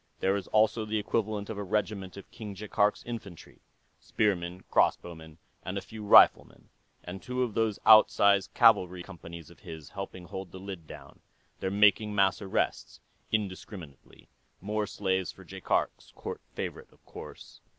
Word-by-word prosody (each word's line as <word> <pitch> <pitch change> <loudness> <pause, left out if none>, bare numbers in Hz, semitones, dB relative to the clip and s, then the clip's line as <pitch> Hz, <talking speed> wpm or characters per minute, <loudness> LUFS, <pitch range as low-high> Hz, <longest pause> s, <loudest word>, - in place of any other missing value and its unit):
There 95 +1 +2
is 100 -2 -4
also 110 +1 +2
the 110 0 -2
equivalent 105 -1 -2
of 110 -2 -5
a - - -3
regiment 100 -1 -2
of 100 - -12
King 105 -4 -8
Jaikark's 105 +1 0
infantry 110 -8 -9 0.4
spearmen, 90 -3 -1
crossbowmen, 80 -2 0 0.3
and 95 - -4
a - - -2
few 110 +2 -10
riflemen 100 - +5 0.3
and 90 +2 -8
two 125 0 -2
of 120 -4 -3
those 110 -2 0
outsize 100 -3 +6
cavalry 90 -1 +3
companies 85 -3 -11
of 85 - -18
his, 80 -6 -10
helping 95 -2 -7
hold 95 0 -7
the 95 - -9
lid 95 -4 -8
down. - - -12 0.4
They're 95 - -2
making 105 +1 +3
mass 95 0 +2
arrests, 95 -2 -2 0.3
indiscriminately. 95 -7 -5 0.3
More 105 +2 -2
slaves 95 -3 -1
for - - -15
Jaikark's - - -2
court - - -6
favorite, - - -6
of - - -27
course." - - -11
100 Hz, 150 wpm, -29 LUFS, 90-105 Hz, 0.4 s, outsize